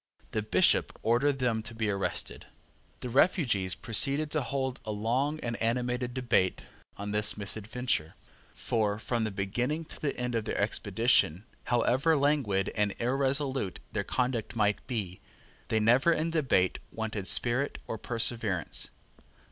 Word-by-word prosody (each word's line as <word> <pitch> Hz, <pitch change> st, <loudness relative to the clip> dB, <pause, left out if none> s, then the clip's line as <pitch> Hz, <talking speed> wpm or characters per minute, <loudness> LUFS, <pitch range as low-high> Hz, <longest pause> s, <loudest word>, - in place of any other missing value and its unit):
The 110 Hz, -, -1 dB
Bishop 105 Hz, -, +2 dB
ordered 135 Hz, +5 st, +2 dB
them 120 Hz, -4 st, 0 dB
to 115 Hz, +1 st, -7 dB
be 110 Hz, -1 st, -1 dB
arrested. 100 Hz, -1 st, -3 dB, 0.5 s
The 125 Hz, -, -4 dB
refugees 120 Hz, -, +2 dB
proceeded 140 Hz, +6 st, +3 dB
to 155 Hz, -, +1 dB
hold 130 Hz, +1 st, -3 dB
a 110 Hz, -, -4 dB
long 125 Hz, +9 st, -1 dB
and 115 Hz, -1 st, -3 dB
animated 125 Hz, +1 st, -1 dB
debate 120 Hz, -8 st, +1 dB, 0.3 s
on 100 Hz, +1 st, -5 dB
this 105 Hz, 0 st, +1 dB
misadventure: 105 Hz, -4 st, -1 dB, 0.4 s
for, 105 Hz, -3 st, -1 dB
from 115 Hz, +1 st, -1 dB
the -, -, -1 dB
beginning 120 Hz, +11 st, -2 dB
to -, -, -8 dB
the 145 Hz, -, -2 dB
end 125 Hz, 0 st, -2 dB
of 115 Hz, -2 st, -1 dB
their -, -, -3 dB
expedition, 100 Hz, -3 st, +2 dB, 0.2 s
however 130 Hz, +6 st, +2 dB
languid 135 Hz, -10 st, +1 dB
and 105 Hz, -2 st, 0 dB
irresolute 135 Hz, -3 st, 0 dB
their -, -, -1 dB
conduct 125 Hz, -3 st, -2 dB
might 105 Hz, -2 st, 0 dB
be, 105 Hz, -8 st, -4 dB, 0.5 s
they 110 Hz, -, +1 dB
never 120 Hz, +9 st, +4 dB
in 165 Hz, 0 st, 0 dB
debate 130 Hz, -, +1 dB
wanted 110 Hz, -3 st, -4 dB
spirit 125 Hz, +4 st, +1 dB
or 110 Hz, -, -5 dB
perseverance. 115 Hz, -7 st, 0 dB
120 Hz, 140 wpm, -29 LUFS, 105-130 Hz, 0.5 s, never